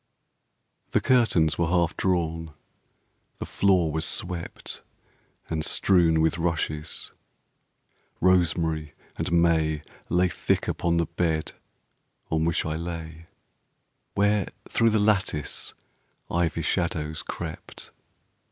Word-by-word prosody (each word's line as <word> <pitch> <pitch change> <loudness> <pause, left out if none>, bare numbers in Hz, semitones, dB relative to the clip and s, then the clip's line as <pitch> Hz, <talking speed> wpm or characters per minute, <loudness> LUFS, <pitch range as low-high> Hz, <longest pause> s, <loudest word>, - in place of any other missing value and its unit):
The - - +5
curtains 110 -12 +3
were 85 - +2
half 85 -1 +2
drawn, 80 -4 -1 0.8
the - - -5
floor 90 -5 +2
was 80 +1 -1
swept 90 -2 -3 0.7
And 80 -1 -2
strewn 85 -1 +3
with 80 +1 +1
rushes, 80 -3 -2 1.1
rosemary 80 -4 +2 0.2
and - - -2
may 80 -3 +2 0.3
Lay 90 +1 +3
thick - - 0
upon 85 -1 0
the 85 - +2
bed 80 -3 -1 0.8
on 80 0 +2
which 85 -1 +1
I 80 0 -2
lay, 80 -1 -6 0.9
Where 105 -1 +2 0.2
through 115 - +3
the 110 - +2
lattice 100 -8 0 0.6
ivy 85 -1 0
shadows 80 -4 -1
crept. - - -7
85 Hz, 105 wpm, -26 LUFS, 80-90 Hz, 1.1 s, The